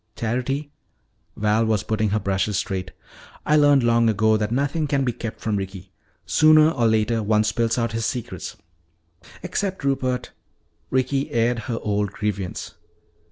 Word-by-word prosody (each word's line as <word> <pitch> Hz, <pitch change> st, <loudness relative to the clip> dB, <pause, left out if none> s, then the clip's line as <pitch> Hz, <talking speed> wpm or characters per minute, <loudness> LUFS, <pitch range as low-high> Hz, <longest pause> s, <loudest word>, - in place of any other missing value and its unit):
"Charity," 130 Hz, +5 st, -2 dB, 0.7 s
Val 105 Hz, +1 st, +2 dB
was 110 Hz, -3 st, +1 dB
putting 110 Hz, -1 st, 0 dB
her 105 Hz, -, +1 dB
brushes 100 Hz, 0 st, -1 dB
straight, 95 Hz, -3 st, -3 dB, 0.6 s
"I 150 Hz, -, +3 dB
learned 145 Hz, -3 st, +5 dB
long 115 Hz, -1 st, +3 dB
ago 110 Hz, +1 st, +3 dB
that 105 Hz, 0 st, -1 dB
nothing 145 Hz, +5 st, 0 dB
can 140 Hz, -1 st, +1 dB
be 125 Hz, -, 0 dB
kept 115 Hz, -1 st, -6 dB
from 110 Hz, -2 st, -1 dB
Ricky. 95 Hz, -1 st, -7 dB, 0.3 s
Sooner 155 Hz, 0 st, +5 dB
or 120 Hz, -7 st, +1 dB
later 110 Hz, +1 st, +1 dB
one 105 Hz, 0 st, +2 dB
spills 115 Hz, +2 st, 0 dB
out 115 Hz, -1 st, 0 dB
his 115 Hz, 0 st, -1 dB
secrets." 120 Hz, -1 st, -5 dB, 0.9 s
"Except 185 Hz, -1 st, -3 dB
Rupert!" 130 Hz, -2 st, -1 dB, 0.6 s
Ricky 130 Hz, +2 st, 0 dB
aired 120 Hz, +1 st, +1 dB
her 115 Hz, -, -1 dB
old 105 Hz, -1 st, -1 dB
grievance. 100 Hz, -3 st, -4 dB
115 Hz, 150 wpm, -23 LUFS, 105-135 Hz, 0.9 s, learned